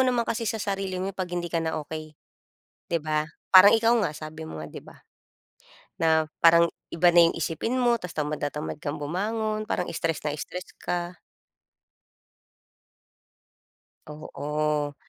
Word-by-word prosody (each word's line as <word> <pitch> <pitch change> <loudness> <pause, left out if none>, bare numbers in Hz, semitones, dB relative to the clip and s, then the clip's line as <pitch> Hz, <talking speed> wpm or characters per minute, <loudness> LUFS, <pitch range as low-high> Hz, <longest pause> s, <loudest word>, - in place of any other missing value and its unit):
naman 250 -2 +2
kasi 230 -1 -2
sa 225 - -1
sarili 195 -2 -3
mo 190 +2 -3
'pag 185 -1 -4
hindi 175 -1 -4
ka 165 - +1
na 160 0 -2
okey, 155 0 -8 0.8
di 170 - +3
ba? 155 0 0 0.3
Parang 185 +2 +10
ikaw 230 +1 +4
nga, - - 0
sabi 155 +1 -8
mo 80 - -7
nga, 75 - -6
di - - -10
ba, - - -15 1.0
na 160 -1 +3 0.2
parang 170 0 +6 0.2
iba 175 +1 +4
na 170 -1 +7
yung - - -5
isipin 225 +10 -2
mo 240 -2 +3
ta's 180 -1 -7
tamad 150 0 -2
na 145 - 0
tamad 150 +1 -6
kang 150 -1 -3
bumangon, 215 +8 -2
parang 180 - 0
stress 165 -1 -1
na 150 - 0
stress 180 +4 -7
ka. 175 0 -3 2.9
Oo. 150 0 -2
170 Hz, 155 wpm, -26 LUFS, 155-195 Hz, 2.9 s, Parang